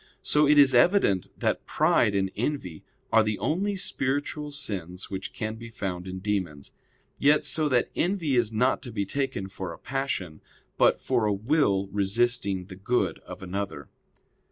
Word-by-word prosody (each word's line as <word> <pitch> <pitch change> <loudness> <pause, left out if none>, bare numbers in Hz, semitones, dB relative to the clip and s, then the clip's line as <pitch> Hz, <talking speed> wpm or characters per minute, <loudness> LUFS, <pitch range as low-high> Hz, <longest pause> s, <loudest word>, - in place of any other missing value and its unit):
So 150 0 +3
it 150 +1 +5
is 140 -2 +7
evident 120 - +4
that - - -1
pride 100 - +3
and 95 -1 0
envy 110 - -3 0.3
are 115 - +7
the 105 -1 -1
only 200 +5 -1
spiritual 145 -3 -2
sins 95 - -4
which 95 0 -5
can 110 0 -4
be 115 0 -9
found 95 -5 -5
in 95 0 -5
demons; 95 -7 -3 0.5
yet 145 +2 +4
so 155 -2 +1
that 125 -3 +1
envy 170 -6 0
is 120 -3 +2
not 125 +4 +1
to 120 - -7
be 100 -3 -2
taken 135 -4 -2
for 95 -2 -6
a 85 - -9
passion, 135 - -3 0.3
but - - +4
for 120 -4 0
a - - +2
will 100 -3 +1
resisting 100 -1 +1
the 95 0 -10
good 120 +6 -1
of - - -9
another. 95 -7 -5
110 Hz, 165 wpm, -27 LUFS, 95-140 Hz, 0.5 s, is